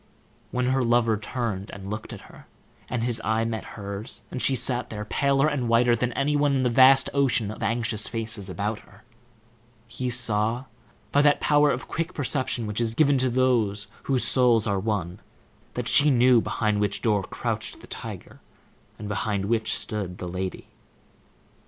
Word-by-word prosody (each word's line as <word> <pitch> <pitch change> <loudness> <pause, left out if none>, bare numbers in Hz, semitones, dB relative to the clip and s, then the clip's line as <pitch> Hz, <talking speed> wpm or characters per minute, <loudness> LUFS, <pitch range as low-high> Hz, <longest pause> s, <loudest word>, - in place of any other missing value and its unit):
When 125 0 -1
her 130 0 +1
lover 115 -1 +3
turned 105 -2 -4
and 100 0 -8
looked 105 0 -6
at - - -8
her, - - -16 0.4
and 120 -3 -2
his 120 -1 0
eye 110 +1 +1
met 115 -1 -3
hers 100 +1 -6
as 125 - -4
she 135 - +3
sat 125 0 -1
there, 105 -1 -6
paler 140 +5 +2
and 135 -6 -1
whiter 120 +1 +4
than 125 +1 -1
any 145 +3 0
one 145 -1 +2
in 130 - +1
the 125 - +1
vast 130 +2 +6
ocean 130 -6 +1
of 110 - -10
anxious 115 -1 0
faces 110 -4 -3
about 105 +3 -3
her, - - -20 0.8
he 125 +2 -4
saw, 120 0 0 0.5
by 145 - +4
that 145 0 +4
power 150 0 +3
of 130 - -2
quick 170 +2 -3
perception 130 -4 -1
which 105 +2 -3
is 115 -1 -2
given 145 -2 +3
to 130 0 +2
those 120 -5 +1 0.2
whose 130 -2 +2
souls 120 -4 +3
are 100 -2 0
one, 95 -3 -3 0.6
that - - -3
she 150 +1 +6
knew 125 -2 +5
behind 105 -2 -1
which 100 -1 0
door 105 -3 +2
crouched - - -4
the - - -12
tiger, - - -8 0.6
and 105 - -7
behind 100 -1 -2
which 110 +1 0
stood 95 -4 -4
the 90 - -6
lady. 95 +1 -5
115 Hz, 175 wpm, -25 LUFS, 105-130 Hz, 0.8 s, vast